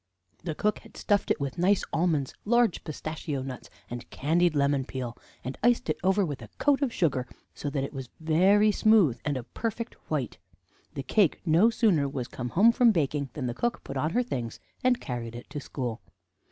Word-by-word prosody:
The 160 -3 -3
cook 210 +5 0
had - - -16
stuffed 205 -1 +1
it - - +2
with 140 +3 -3
nice 195 +3 +3
almonds, 160 -6 +1
large 235 -2 +2
pistachio 155 -3 -4
nuts, 130 -2 -7 0.2
and 120 0 -7
candied 165 +3 +1
lemon 140 -1 +2
peel, 125 -2 -5 0.3
and 130 - -6
iced 240 -8 +3
it - - -4
over 190 +1 +3
with 145 -5 -5
a - - -9
coat 285 -1 +3
of 275 -4 +1
sugar, 135 - 0 0.3
so 145 - -4
that 140 -1 -1
it 140 - -5
was 135 -3 -6
very 190 +7 +4
smooth 205 - +4
and 145 -3 -1
a 125 - -4
perfect 230 - -4 0.2
white. 140 -11 -2 0.6
The 140 - -3
cake 185 +5 +2
no 170 +7 +5
sooner 185 - +2
was 130 -4 -4
come 125 -1 -5
home 210 - +5
from 235 0 +5
baking 145 -6 0
than 140 - -4
the 120 - -1
cook 240 - -2
put 135 - -7
on 150 +4 0
her 250 - +2
things, 120 - -4 0.2
and 250 -1 +3
carried 120 -2 -5
it 120 - -9
to 145 - -4
school. 125 -5 -4
155 Hz, 200 wpm, -28 LUFS, 135-205 Hz, 0.6 s, no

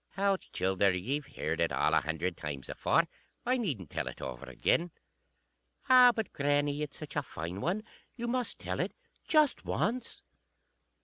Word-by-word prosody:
"_ - - -49
"Hout, 195 -1 +1
childer, 95 +1 +2
ye've 130 +11 -2
heard 80 +2 -2
it 85 - +2
a - - +3
hundred 80 +3 -2
times 75 -4 -6
afore. - - +2 0.4
I 255 +2 +3
needn't 130 - -3
tell - - -2
it - - -6
over 65 -2 -6
again." 170 - +1 1.0
_"Ah! 250 -1 +9
but, 220 -2 -3
grannie, 145 +1 +1
it's 150 -1 -4
such 155 - -8
a 145 - +2
fine 90 - -6
one. 195 +6 0 0.3
You 240 -1 -4
must 245 -1 0
tell - - -4
it. - - -1 0.3
Just 305 -3 +4
once." 245 +4 -2
145 Hz, 165 wpm, -31 LUFS, -, 1.0 s, Ah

